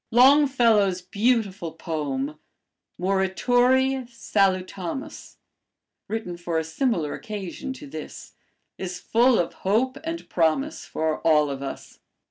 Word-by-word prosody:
Longfellow's 240 -7 +5
beautiful 200 -4 0
poem, 150 -3 -3 0.6
'Morituri 245 +8 +2
Salutamus,' 195 - -2 0.7
written 215 -6 -4
for 170 -1 -2
a 160 - +1
similar 160 - -1
occasion 215 +4 -6
to 290 - -11
this, 280 - -9 0.5
is 180 -1 -4
full 240 +5 +3
of 170 - 0
hope 250 +8 +1
and 330 +1 -5
promise 180 - 0
for 160 -1 -2
all 150 -3 +3
of 135 0 -5
us. 135 - -7
195 Hz, 105 wpm, -25 LUFS, 170-250 Hz, 0.7 s, Longfellow's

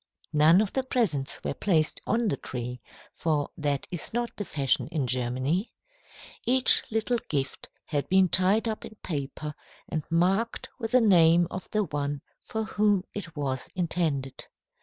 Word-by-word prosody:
None 155 +5 +6
of 215 - -2
the 265 - +1
presents 210 - 0
were - - -1
placed 160 -2 +1
on 235 0 +1
the 140 - 0
tree, 125 -1 -6 0.3
for 150 -3 -1
that 145 -2 -1
is 175 -4 -4
not 240 0 -2
the 205 - -3
fashion 140 -5 +1
in 150 -5 -2
Germany. 130 - -1 0.7
Each 255 +1 +5
little 225 +2 0
gift 135 -2 -2 0.2
had 145 -2 -2
been 190 0 +5
tied 190 +6 +3
up 220 -1 -3
in 220 - -10
paper 150 -1 -4 0.3
and 155 - -2
marked 190 +7 +1
with 225 -1 -4
the 255 - +6
name 175 -5 +5
of 185 - -6
the 215 0 +1
one 145 -4 -3 0.2
for 220 0 -3
whom 205 -2 +2
it 180 -5 -5
was 135 -3 -3
intended. 160 -7 -1
170 Hz, 160 wpm, -27 LUFS, 145-210 Hz, 0.7 s, None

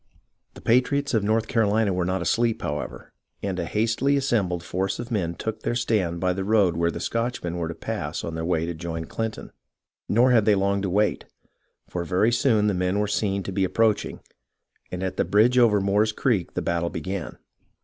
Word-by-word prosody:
The - - -11
patriots 140 +4 +2
of 110 -3 +2
North 110 +2 +1
Carolina 110 -3 +2
were 90 -1 0
not 95 +1 -1
asleep, 115 -1 +1
how 75 -3 -1
ever, - - -8 0.3
and 95 -2 -2
a 85 - -1
hastily 115 +6 +1
assembled 100 -11 0
force 95 +3 -2
of 120 +1 -7
men 85 -6 -1
took 110 +3 -4
their 120 - -1
stand 95 -8 0
by 90 +1 +1
the 95 +1 -3
road 100 -4 +3
where 85 0 +1
the - - -5
Scotchmen 115 -7 -2
were 85 -2 -2
to 85 - -5
pass 75 +3 -4
on 85 - -4
their 80 0 -3
way 85 -1 0
to 85 - -3
join 80 0 -5
Clinton. 110 +5 -5 0.6
Nor 120 +4 +4
had 115 -4 +4
they 105 - +5
long 100 0 +1
to 95 - -1
wait, 105 +3 +1 0.6
for 90 - -3
very 90 +7 +2
soon 115 -3 +2
the 105 - +2
men 90 +1 0
were 105 - +1
seen 100 -1 -1
to 95 - -5
be 95 +1 0
approaching, 105 +4 +1 0.7
and 90 +1 -4
at 95 - -3
the - - +3
bridge 120 +5 +4
over 110 -4 +5
Moore's 100 +3 +2
Creek 105 -7 0
the - - -1
battle 85 0 0
began. 95 +4 -5
100 Hz, 205 wpm, -25 LUFS, 90-115 Hz, 0.7 s, they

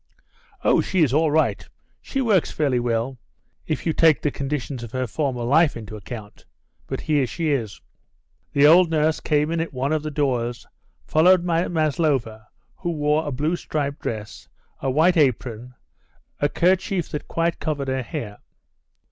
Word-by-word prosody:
"Oh, - - +4
she 185 -3 +1
is 135 -4 +1
all 155 +2 +3
right. 155 +2 +1 0.4
She 270 - -3
works 210 -9 +2
fairly 140 -5 +1
well, 120 +2 -2 0.5
if - - -2
you 160 - +1
the 155 -3 +3
conditions 140 -2 -4
of 120 0 -9
her 130 0 -1
former 125 0 -2
life 145 +4 +3
into 110 -1 -8
account. 105 0 -10 0.4
But - - -4
here 145 -4 +1
she 160 +3 -2
is." 115 -8 -2 0.7
The 140 0 +4
old 170 +3 +7
nurse 155 0 +1
came 150 0 +1
in 165 - 0
at 165 -2 -3
one 135 +4 -1
of 155 - 0
the 155 - -4
doors, 125 -5 -1 0.4
followed 175 +3 +4
by 170 0 +1
Maslova, 145 -9 0 0.3
who 175 - -4
wore 150 -1 0
a - - -2
blue 150 +6 0
striped 145 -4 -3
dress, 105 -2 -6 0.3
a 135 - -2
white 165 +7 +3
apron, 125 -3 0 0.6
a 145 - +2
kerchief 185 +1 +1
that 150 - -5
quite 165 0 -1
covered 145 -3 -2
her 130 0 -1
hair. 105 -3 -6
145 Hz, 165 wpm, -23 LUFS, 125-160 Hz, 0.7 s, old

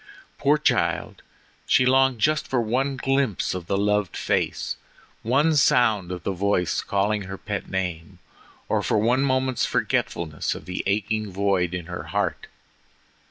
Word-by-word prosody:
Poor 145 +2 +3
child, 150 - 0 0.5
she 130 - +4
longed 130 0 +4
just 155 +7 +1
for 130 - 0
one 130 +4 0
glimpse 135 -6 0
of 90 -2 -6
the 100 - 0
loved 105 -2 0
face, - - -1 0.5
one 145 +7 +2
sound 110 -9 +3
of 90 -1 -5
the - - -1
voice 95 -3 0
calling 100 0 0
her 95 +1 -6
pet 100 0 -5
name, 90 -4 -4 0.5
or - - +1
for - - +1
one 120 +5 +2
moment's 130 -3 +1
forgetfulness 80 -3 -1
of - - -10
the 90 - -3
aching 105 +1 -1
void 95 -2 0
in 90 -2 -5
her 90 +1 -6
heart. - - -2
105 Hz, 150 wpm, -24 LUFS, 95-130 Hz, 0.5 s, she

